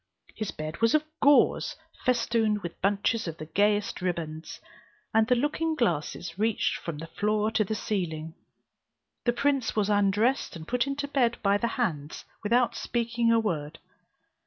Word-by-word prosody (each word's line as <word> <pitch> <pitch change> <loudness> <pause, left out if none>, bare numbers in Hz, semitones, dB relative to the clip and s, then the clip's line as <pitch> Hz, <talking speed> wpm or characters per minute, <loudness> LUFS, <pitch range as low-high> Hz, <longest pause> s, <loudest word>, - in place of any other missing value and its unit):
His 215 -2 -4
bed 155 +3 -6
was 230 +5 +4
of 305 - +3 0.2
gauze, 285 0 +4 0.3
festooned 230 -4 +1
with 170 - -7
bunches 205 +2 +1
of 165 -1 -5
the 155 - -7
gayest 205 +6 +1
ribands, 165 -3 -4 0.5
and 220 0 +4
the 250 - +4
looking 315 +5 0
glasses 175 - -1
reached 220 0 +1
from 170 -3 -6
the 160 - -6
floor 210 +5 0
to 220 - +2
the 215 +2 -3
ceiling. 165 -7 -3 0.9
The 240 - +3
prince 275 -1 +1
was 210 -1 +1
undressed 205 +6 +2
and 160 -1 -9
put 250 +2 +1
into 285 +1 -2
bed 250 -5 +1
by 200 0 +3
the 235 - +1
hands, 155 - -2 0.2
without 235 +3 +2
speaking 235 -1 0
a 230 - +5
word. 165 -7 -2
215 Hz, 160 wpm, -28 LUFS, 175-235 Hz, 0.9 s, a